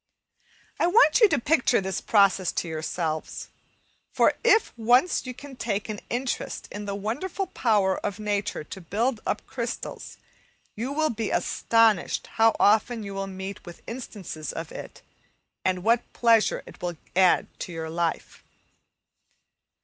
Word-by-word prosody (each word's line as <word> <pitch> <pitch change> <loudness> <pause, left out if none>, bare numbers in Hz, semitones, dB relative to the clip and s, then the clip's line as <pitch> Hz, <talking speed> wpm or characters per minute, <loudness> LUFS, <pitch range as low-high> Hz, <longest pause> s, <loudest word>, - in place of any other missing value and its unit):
I - - +3
want 460 +6 +5
you 435 - +8
to - - +2
picture 265 -1 +2
this 190 -1 -3
process 195 -4 +3
to - - -2
yourselves, 160 0 -3 0.6
for - - +4
if 450 -1 +4
once 245 +7 +3
you 250 - -4
can 280 +1 -11
take 220 -3 -3
an 210 -1 -4
interest 250 +1 -3
in 205 0 -6
the 200 -1 -3
wonderful 280 - -3
power 210 - +1
of 200 - -3
nature 205 -4 -2
to 190 +5 -9
build 220 +8 -1
up 210 - -2
crystals, 235 -2 -5 0.6
you 240 +5 -3
will 310 +2 +1
be 225 -1 -3
astonished 225 -4 +2 0.2
how 225 0 +6
often 220 +2 +3
you 200 -1 -6
will 195 0 -3
meet 190 +1 -7
with 175 - -12
instances 200 - -6
of 165 -1 -6
it, - - -9 0.6
and 185 -1 0
what 230 +2 +2
pleasure 230 -2 +3
it - - -14
will 175 -2 -3 0.2
add 185 -1 +5
to - - -5
your 160 -1 -5
life. 170 0 -3
210 Hz, 150 wpm, -26 LUFS, 190-240 Hz, 0.6 s, you